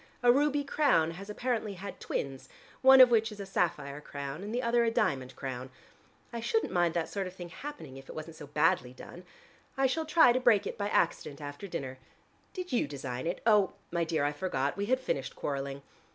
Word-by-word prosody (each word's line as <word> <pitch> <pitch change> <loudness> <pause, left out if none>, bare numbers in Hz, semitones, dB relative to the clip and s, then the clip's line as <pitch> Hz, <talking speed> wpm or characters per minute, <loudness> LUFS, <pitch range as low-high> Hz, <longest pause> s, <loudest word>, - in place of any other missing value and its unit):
A 240 - +7
ruby 290 +2 +2
crown 270 - +2
has 195 +5 -9
apparently 220 -2 -2
had 190 +1 -8
twins, 135 -1 -4 0.3
one 265 0 +9
of 250 -1 +8
which 225 -1 +3
is 210 - -10
a 200 - -5
sapphire 150 -7 -1
crown 140 +2 -6
and 205 - -5
the 245 +2 -1
other 235 0 +3
a 230 - +3
diamond 135 - 0
crown. 130 -1 -5 0.6
I 235 - -3
shouldn't 445 - 0
mind 175 -2 +2
that 170 -1 0
sort 195 -2 -3
of 185 - -10
thing 175 -2 -8
happening, 165 - -8
if 135 - -13
it - - -8
wasn't 155 +1 -7
so 150 - -10
badly 125 -3 +1
done. 175 +7 -11 0.5
I 270 - +3
shall 315 +4 0
try 315 -7 +6
to 255 - +1
break 235 -5 +4
it - - -4
by 205 -1 -2
accident 150 -6 0
after 145 +6 -7
dinner. 135 -7 -5 0.5
Did 365 -1 -6
you 235 - +2
design 135 -1 -5
it? 175 - -4 0.5
My 170 -1 0
dear, 160 -3 0
I 145 - +1
forgot: 145 -3 -2
we 200 0 -2
had 255 +2 +2
finished 135 - -3
quarreling. 140 0 -4
180 Hz, 210 wpm, -30 LUFS, 140-240 Hz, 0.6 s, one